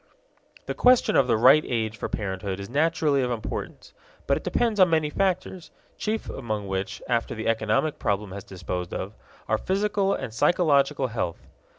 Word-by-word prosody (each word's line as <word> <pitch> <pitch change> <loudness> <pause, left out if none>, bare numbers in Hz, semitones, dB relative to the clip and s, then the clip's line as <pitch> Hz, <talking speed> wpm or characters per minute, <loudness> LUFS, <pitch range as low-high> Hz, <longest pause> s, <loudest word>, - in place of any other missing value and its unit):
The - - -3
question 250 0 +4
of 130 - +4
the 115 -3 +3
right 135 +7 +6
age 110 -2 -2
for 105 - -5
parenthood 95 -2 -3
is 100 +3 -8
naturally 150 -1 +2
of 125 - -1
importance. 120 -3 -5 0.3
But - - +2
it - - -5
depends 225 -3 0
on 185 -2 +6
many 160 -2 +1
factors, 185 -1 -1 0.3
chief 220 +1 -3
among 110 -5 -4
which, 95 0 -4
after 120 -1 -1
the 110 - -4
economic 110 +6 0
problem 100 -1 -1
has 100 +1 -7
been 95 - -12
disposed 90 -1 -4
of, 95 +3 -5 0.3
are 110 0 +1
physical 200 0 0
and 130 -5 -6
psychological 140 0 +2
health. 90 -7 -4
125 Hz, 175 wpm, -25 LUFS, 105-160 Hz, 0.3 s, right